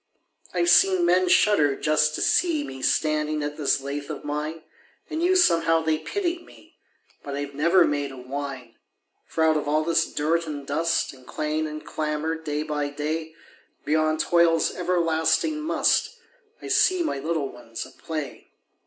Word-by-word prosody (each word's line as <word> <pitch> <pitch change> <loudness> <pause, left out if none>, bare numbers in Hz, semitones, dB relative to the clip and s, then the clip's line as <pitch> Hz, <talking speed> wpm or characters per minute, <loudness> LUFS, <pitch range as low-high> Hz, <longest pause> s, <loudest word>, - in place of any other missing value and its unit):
I've 175 -1 +2
seen 185 -1 +5
men 180 +1 +3
shudder 155 -9 +4
just 150 +1 +1
to - - -1
see 330 -5 +2
Me 130 - -8
standing 155 0 0
at 145 0 -4
this 145 -2 +1
lathe 140 +2 -5
of 150 - -6
mine, 150 +2 -4 0.5
And 315 - -2
knew 360 +2 +3
somehow 165 - +3
they 160 -1 +1
pitied 350 -3 -3
me, - - -19 0.4
But 140 -1 -5
I 140 - -3
have 145 0 -6
never 170 +5 +4
made 145 -1 -2
a 135 - -10
whine; 130 -2 -7 0.5
For 160 - -1
out 160 -1 +4
of 150 - -3
all 155 +1 +2
this 165 0 +1
dirt 165 +3 0
and 145 -2 -6
dust 165 +3 0
And 130 -1 -18
clang 155 +1 -2
and 155 0 -8
clamor 155 +1 -2
day 150 -2 -3
by 150 -2 -2
day, 155 +2 -4 0.5
Beyond 155 +1 +1
toil's 170 -2 +3
everlasting 170 - +1
"must," 310 - +1 0.5
I - - -6
see 370 -2 +3
my 140 - -2
little 155 -1 -2
ones 115 -2 -8
at - - -17
play. 155 -4 -6
155 Hz, 170 wpm, -25 LUFS, 145-170 Hz, 0.5 s, seen